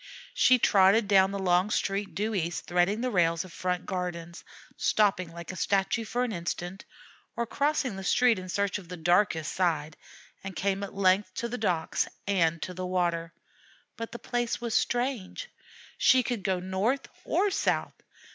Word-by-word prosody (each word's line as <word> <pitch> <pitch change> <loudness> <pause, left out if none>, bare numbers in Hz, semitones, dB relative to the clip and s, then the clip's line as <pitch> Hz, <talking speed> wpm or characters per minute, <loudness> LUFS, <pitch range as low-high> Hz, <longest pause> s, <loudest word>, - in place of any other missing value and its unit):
She 255 - +5
trotted 200 0 +4
down 190 -1 +5
the 200 - -4
long 185 0 +2
Street 200 -1 -1
due 215 +2 -1
east, 175 -3 -2
threading 180 +5 +1
the 250 0 -1
rails 170 -3 +2
of 180 - -13
front 180 +1 -2
gardens, 175 -2 -5 0.3
stopping 190 -5 +1
like 170 +1 -8
a - - -9
statue 200 +4 0
for 240 +3 -1
an 250 - -2
instant, 175 +1 -5 0.5
or 235 - -1
crossing 280 -2 0
the 195 - -6
street 240 +1 +3
in 185 0 -8
search 200 +2 -1
of 180 - -13
the 180 - -6
darkest 175 -1 +2
side, 160 -4 0 0.5
and 195 -1 -6
came 195 +4 -1
at 200 -1 -6
length 190 0 +2
to 235 - -2
the 245 0 -5
docks 175 -7 0 0.2
and 170 -5 +1
to 180 - -5
the 185 0 -4
water. 170 -2 -1 0.6
But 230 0 -6
the - - -6
place 240 -1 -2
was 235 -2 -3
strange. 245 - -1 0.5
She 255 0 +5
could 240 -3 -2
go 190 -2 0
north 190 +9 -1 0.2
or 405 0 +1
south. - - 0
190 Hz, 175 wpm, -28 LUFS, 180-225 Hz, 0.6 s, She